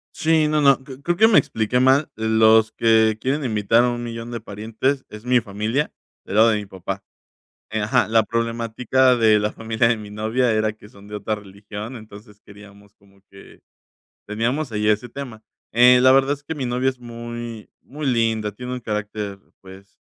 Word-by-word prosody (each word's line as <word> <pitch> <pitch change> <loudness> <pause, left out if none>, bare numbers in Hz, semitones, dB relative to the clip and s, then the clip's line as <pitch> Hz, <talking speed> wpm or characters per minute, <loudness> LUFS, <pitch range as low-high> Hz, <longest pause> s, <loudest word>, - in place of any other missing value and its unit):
Sí, 160 -1 +2
no, 150 0 +1
no. 140 -1 +5
Cre 135 -1 -11
creo 175 +4 -1
que 220 - +6
me 225 - +6
expliqué 110 +3 -1
mal. 135 +3 +4
Los 110 0 +4
que 110 -1 +3
quieren 140 +4 -1
invitar 115 0 +2
a 125 - +2
un 120 0 -4
millón 115 0 -6
de 120 -1 -5
parientes 110 +6 -3
es 105 +2 -11
mi 125 0 +4
familia, 110 +8 -2 0.3
del 100 - -6
lado 115 +1 +6
de 110 - +1
mi 105 -1 -6
papá. 95 +1 -6 0.7
Eh 110 0 -2
ajá, 120 +2 +1
la 115 0 +4
problemática 115 +3 +1
de 110 -2 +4
la 105 +1 -1
familia 115 +1 0
de 115 -1 +1
mi 105 -1 -10
novia 110 +4 0
era 110 -1 +1
que 105 -1 -17
son 100 -3 -17
de 105 - -9
otra 105 +1 -2
religión, 105 +3 -9
entonces 105 -2 -13
queríamos 100 0 -17
como 100 -1 -26
que 100 0 -16 0.7
teníamos 120 +6 -2
ahí 105 0 -1
ese 105 +3 +1
tema. 120 -4 -9 0.3
Eh, 125 +2 +6
la 130 0 +6
verdad 135 +1 +4
es 145 0 -10
que 160 +2 -5
mi 135 -3 -3
novia 125 +2 0
es 130 -1 -9
muy, 120 -1 -8
muy 145 +1 -6
linda, 115 -3 0
tiene 125 +4 -7
un 125 - -4
carácter, 105 -2 -4 0.2
pues, 95 +1 -15
115 Hz, 195 wpm, -21 LUFS, 105-125 Hz, 0.7 s, que